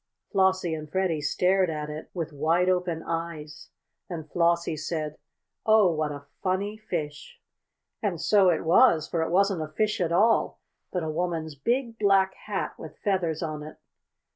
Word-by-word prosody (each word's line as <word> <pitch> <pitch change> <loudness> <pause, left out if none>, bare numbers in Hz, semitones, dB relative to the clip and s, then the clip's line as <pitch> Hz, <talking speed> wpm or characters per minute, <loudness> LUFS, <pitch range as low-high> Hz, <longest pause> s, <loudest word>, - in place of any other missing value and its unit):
Flossie 190 -3 +2
and 155 -1 -6
Freddie 185 -4 0
stared 185 +5 +2
at 150 -1 -3
it 150 +1 -7
with 165 -3 -4
wide 165 +5 +2
open 180 -3 0
eyes. 165 -2 -5 0.4
Then 170 -3 -5
Flossie 170 0 +1
said: 155 0 -4 0.4
"Oh, 215 -4 +5
what 155 -1 -1
a 145 0 -8 0.2
funny 195 +3 -1
fish!" 175 - -5 0.6
And 195 -6 -1
so 190 +3 +4
it 170 - +1
was, 165 - +5
for 165 - -1
it 160 - -1
wasn't 195 0 +2
a 155 - -3
fish 210 +6 -1
at 170 -2 0
all, 220 +7 +3 0.3
but 180 -3 -2
a 160 - -2
woman's 165 -1 -2
big 230 - -1
black 195 -2 +4
hat, 205 -2 -4
with - - -10
feathers 175 -5 0
on 155 -2 -4
it. 155 +1 -9
170 Hz, 165 wpm, -27 LUFS, 155-190 Hz, 0.6 s, Oh